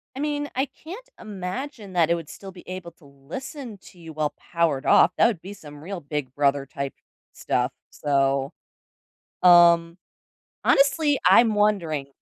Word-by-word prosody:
I 270 - -6
mean, 290 0 -2
I 265 +2 +1
can't 370 - -11
imagine 210 +2 -7
that 170 -2 +2
it 170 - +3
would 165 -3 -8
still 195 -1 -10
be 180 -1 -15
able 185 -2 -7
to 155 - -23
listen 210 - -9
to 180 - -20
you 165 -1 -10
while 150 -1 -2
powered 165 -6 -1
off, 175 - +5
that - - +5
would 210 -8 -3
be 195 +2 -9
some 150 -6 -13
real 190 0 -6
big 140 -3 -5
brother 140 -1 +1
type 140 0 -5 0.4
stuff - - -1 0.2
so, 135 -1 0 0.9
um, 170 -1 +6 0.7
honestly, 285 +1 +3
I'm 230 -2 +6
wondering 170 -9 0
175 Hz, 155 wpm, -24 LUFS, 145-215 Hz, 0.9 s, um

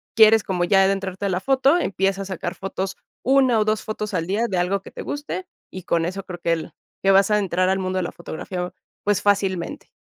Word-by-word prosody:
quieres 220 -1 +7
como 180 -2 -1
ya 195 +2 +5
adentrarte 195 0 -1
a - - -1
la 180 -1 0
foto, 270 - +3
empieza 195 - 0
a - - -8
sacar 185 -1 -4
fotos 195 +1 -4 0.3
una 260 -3 +4
o 215 - +2
dos 215 0 0
fotos 210 -1 -4
al 165 -2 0
día 215 +5 +1
de 190 - -2
algo 185 +2 +1
que - - -11
te - - -7
guste 295 +6 -4 0.3
y 185 - -7
con 165 -1 +1
eso 190 +3 -4
creo 180 -1 -8
que 170 0 +1
el 165 -1 -4 0.3
que 195 - +5
vas 195 +1 +5
a 210 - +4
entrar 185 -2 +1
al 190 - +2
mundo 185 0 -2
de 185 - 0
la - - -4
fotografía, 180 +2 -5 0.3
pues 205 -1 +1
fácilmente. 195 -4 0
195 Hz, 235 wpm, -23 LUFS, 185-210 Hz, 0.3 s, quieres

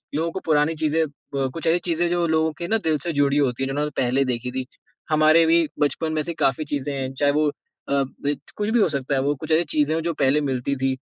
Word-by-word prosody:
लोगों 165 +2 0
को 190 - -4
पुरानी 155 0 +2
चीज़ें 155 +1 +1
अ, 140 -2 -4
कुछ 165 - -4
ऐसी 165 +2 +3
चीज़ें 170 0 +1
जो 175 -1 +1
लोगों 160 0 +2
के 170 - -4
ना 225 - +2
दिल 160 -1 +1
से 175 - -1
जुड़ी 140 0 +2
होती 135 -3 +1
हैं - - 0
जिन्होंनें 150 +2 -1
पहले 130 +2 +2
देखी 125 -1 -3
थी। 130 0 -3 0.4
हमारे 155 +1 +5
भी 165 0 +4
बचपन 155 +2 0
में 155 - 0
से 170 - -2
काफ़ी 135 +3 +1
चीज़ें 145 -1 -3
हैं 135 -1 -3
चाहे 145 +1 +2
वो 150 +1 +2
अ, - - -3 0.4
ब 140 +1 -1 0.2
कुछ 210 0 -1
भी 235 +2 +3
हो 205 - +4
सकता 140 -2 -1
है 135 - +1
वो। 145 +2 0
कुछ 155 +3 -7
ऐसी 160 +2 +4
चीज़ें 150 +1 +2
हैं 165 - -1
जो 170 0 -1
पहले 145 +1 +2
मिलती 130 +2 -1
थी। 130 0 -1
150 Hz, 255 wpm, -23 LUFS, 135-160 Hz, 0.4 s, हमारे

